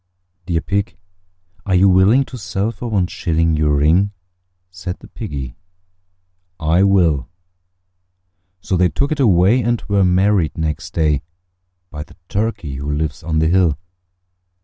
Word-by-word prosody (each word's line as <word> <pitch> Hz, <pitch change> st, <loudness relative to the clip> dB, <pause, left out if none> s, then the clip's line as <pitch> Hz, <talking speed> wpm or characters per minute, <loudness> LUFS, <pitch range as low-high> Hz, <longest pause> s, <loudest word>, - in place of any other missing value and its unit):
"Dear 85 Hz, -3 st, 0 dB
Pig, 100 Hz, +3 st, -2 dB, 0.7 s
are 95 Hz, -1 st, 0 dB
you 95 Hz, +2 st, +5 dB
willing 95 Hz, +8 st, +5 dB
to 130 Hz, -, -10 dB
sell 105 Hz, -1 st, -2 dB
for 120 Hz, -, -7 dB
one 100 Hz, -5 st, +1 dB
shilling 80 Hz, -2 st, 0 dB
Your 75 Hz, -1 st, +2 dB
ring?" 85 Hz, +8 st, +2 dB, 0.6 s
Said 90 Hz, 0 st, -6 dB
the -, -, -15 dB
Piggy, 70 Hz, -, -6 dB, 1.1 s
"I 80 Hz, +3 st, +2 dB
will." 85 Hz, -9 st, +2 dB, 1.3 s
So 95 Hz, -, -1 dB
they 90 Hz, 0 st, +3 dB
took 140 Hz, -, -1 dB
it 155 Hz, -, -1 dB
away, 105 Hz, 0 st, +4 dB
and 120 Hz, -1 st, 0 dB
were 100 Hz, -1 st, +2 dB
married 90 Hz, -2 st, +2 dB
next 80 Hz, +3 st, -3 dB
day 75 Hz, -4 st, +1 dB, 0.7 s
By 75 Hz, -, -6 dB
the -, -, -19 dB
Turkey 100 Hz, -10 st, -2 dB
who 70 Hz, +2 st, -4 dB
lives 75 Hz, 0 st, -2 dB
on 80 Hz, 0 st, -2 dB
the 80 Hz, +1 st, +3 dB
hill. 85 Hz, -4 st, +2 dB
90 Hz, 145 wpm, -18 LUFS, 80-100 Hz, 1.3 s, you